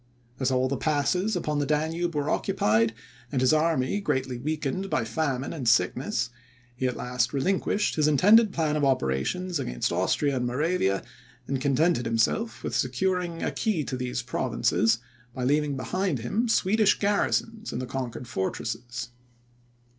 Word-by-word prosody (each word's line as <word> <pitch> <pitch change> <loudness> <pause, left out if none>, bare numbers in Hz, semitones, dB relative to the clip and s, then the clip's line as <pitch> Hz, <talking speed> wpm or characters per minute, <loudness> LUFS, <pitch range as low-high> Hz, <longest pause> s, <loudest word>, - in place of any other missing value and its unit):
As 130 -1 +1
all 130 0 +2
the 140 +1 -2
passes 180 +7 +1
upon 150 -4 -1
the 145 - +1
Danube 160 +3 0
were 145 -1 -1
occupied, 115 - +1 0.4
and 135 - 0
his 130 +3 +4
army 155 +1 +1
greatly 130 -8 -1
weakened 155 +6 -2
by 115 - 0
famine 135 +2 -2
and 130 -8 0
sickness, 125 - +1 0.4
he 130 +1 -1
at 125 - -3
last 125 -1 -1
relinquished 190 +7 +1
his 150 -1 +3
intended 205 - +6
plan 155 -4 0
of 150 - 0
operations 135 - 0
against - - -2
Austria 140 -3 +1
and 125 -1 -1
Moravia, 125 - 0 0.4
and 135 -1 -2
contented 140 -2 +2
himself 115 - 0
with - - -3
securing 175 +6 -1
a - - 0
key 205 -9 0
to 135 - -4
these 125 -1 -3
provinces, 115 -1 +1 0.4
by 125 - -3
leaving 145 +1 +1
behind 185 +4 -1
him 210 - -1
Swedish 215 0 +3
garrisons 215 +2 0
in - - -4
the 130 - -3
conquered 125 -2 -5
fortresses. 120 +5 -4
140 Hz, 155 wpm, -27 LUFS, 125-175 Hz, 0.4 s, intended